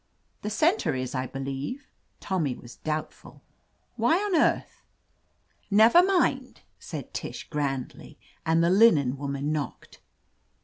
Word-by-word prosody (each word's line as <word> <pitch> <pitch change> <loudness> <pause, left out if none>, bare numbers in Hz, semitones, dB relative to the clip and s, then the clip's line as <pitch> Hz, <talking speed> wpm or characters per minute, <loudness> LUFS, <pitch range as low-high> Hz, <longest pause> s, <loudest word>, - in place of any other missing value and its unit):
"The 210 - -3
center 315 - +1
is, 130 -1 -4
I 130 -1 -2
believe," 135 - -5 0.3
Tommy 160 -10 -1
was 120 - -13
doubtful. 155 0 -6 0.5
'What 345 - +2
on 325 - +4
earth—" - - 0 0.9
"Never 220 - +7
mind!" 375 0 0 0.2
said - - -8
Tish - - -6
grandly, 140 -4 -4 0.3
and 165 +1 +2
the 170 - +3
linen 175 - +5
woman 140 +1 -3
knocked. 150 -2 -5
155 Hz, 120 wpm, -26 LUFS, 135-230 Hz, 0.9 s, Never